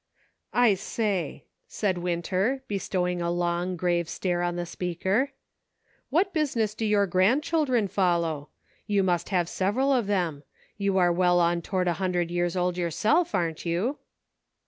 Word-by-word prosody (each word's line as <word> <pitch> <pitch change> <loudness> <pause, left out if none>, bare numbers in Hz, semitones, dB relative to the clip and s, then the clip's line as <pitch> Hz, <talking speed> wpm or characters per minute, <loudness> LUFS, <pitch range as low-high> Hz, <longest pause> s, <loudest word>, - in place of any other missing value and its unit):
" - - -43
I 210 - +5
say," 195 - -2 0.2
said 190 -4 -1
Winter, 185 +9 -1
bestowing 180 -3 -1
a 170 - -1
long, 175 +1 -1
grave 175 -1 0
stare 175 -2 -1
on 175 0 -1
the 175 0 -3
speaker, 190 - -1 0.8
"what 365 +7 +1
business 245 - 0
do 220 +1 -3
your 205 -1 +3
grandchildren 245 - +2
follow? 170 -6 0 0.4
You 200 -2 +2
must 175 -2 0
have 180 -4 +1
several 235 +11 +1
of 240 -6 +1
them. 175 -8 0 0.3
You 200 -1 0
are 175 -2 +4
well 175 0 +3
on 170 0 +2
toward 185 +1 -1
a 175 - +2
hundred 175 -2 0
years 175 +1 0
old 180 0 0
yourself, 220 - +1
aren't 165 -2 -1
you 185 - -1
185 Hz, 150 wpm, -26 LUFS, 175-210 Hz, 0.8 s, I